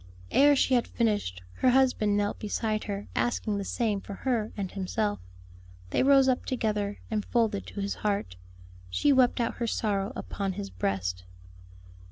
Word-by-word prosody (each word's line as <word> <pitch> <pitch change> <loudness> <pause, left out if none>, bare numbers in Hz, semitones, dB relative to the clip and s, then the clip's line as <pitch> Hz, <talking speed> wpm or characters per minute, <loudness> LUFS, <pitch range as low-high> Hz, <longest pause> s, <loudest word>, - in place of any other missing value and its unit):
Ere 290 +1 +6
she 265 - +2
had 240 -2 +3
finished, 205 - -1
her 255 - +4
husband 250 -5 +3
knelt 205 0 -1
beside 215 0 -2
her 200 0 -4
asking 215 -3 0
the - - -2
same 210 -1 -1
for 200 - -8
her 230 -2 -1
and 195 -3 -3
himself. 205 +2 -1 0.7
They - - +2
rose 270 0 +6
up 255 -1 +2
together, 210 -5 -1
and 215 -1 0
folded 225 -4 0
to 200 - -5
his 200 0 -1
heart, 200 - -1 0.5
she 285 - +3
wept 255 -1 +4
out 235 - -1
her 235 - -1
sorrow 205 -2 -1
upon 195 -2 -3
his 100 - -6
breast. 90 -1 -2
210 Hz, 165 wpm, -28 LUFS, 200-240 Hz, 0.7 s, Ere